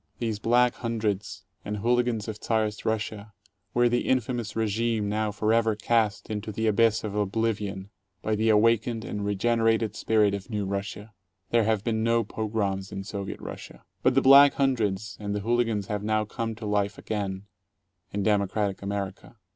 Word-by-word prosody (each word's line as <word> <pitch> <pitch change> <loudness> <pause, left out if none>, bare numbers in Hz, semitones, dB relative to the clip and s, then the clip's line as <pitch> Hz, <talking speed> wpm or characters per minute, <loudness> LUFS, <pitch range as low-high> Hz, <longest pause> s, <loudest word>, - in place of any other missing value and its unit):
These 110 -3 -2
Black 120 +2 +3
Hun 115 -1 -3
dreds 100 -3 -2 0.2
and 105 +1 -4
hooligans 120 0 +1
of 110 -1 -6
Czarist 110 -2 -1
Russia 110 -1 -3 0.4
were 120 0 +5
the 120 0 0
infamous 120 -3 -1
regime 110 0 0
now 105 +1 0
forever 110 +1 +1
cast 110 -1 0
into 110 0 -4
the 110 +2 -2
abyss 110 +1 +3
of 105 -2 -4
oblivion 105 -1 -2 0.3
by 110 - 0
the 110 +1 +1
awakened 115 +1 +3
and 105 - -4
regenerated 115 +2 +1
spirit 105 -2 +2
of 100 -1 -5
New 105 -3 -2
Russia. 100 +2 -5 0.4
There 115 -2 +3
have 110 -2 +1
been 110 -1 0
no 115 0 +2
pogroms 100 -3 -2
in 95 - -5
Soviet 100 -1 -5
Russia. - - -9 0.2
But - - +3
the - - +4
Black 140 +1 +8
Hundreds 110 -7 0
and 100 -1 -3
the 105 - -2
hooligans 115 -2 0
have 105 0 -3
now 110 0 0
come 115 +1 -4
to 110 0 -8
life 105 -1 0
again 100 -3 -3 0.3
— 95 -2 -49
in 100 0 -2
democratic 100 -1 0
America. 100 +2 -5
110 Hz, 170 wpm, -27 LUFS, 100-115 Hz, 0.4 s, Black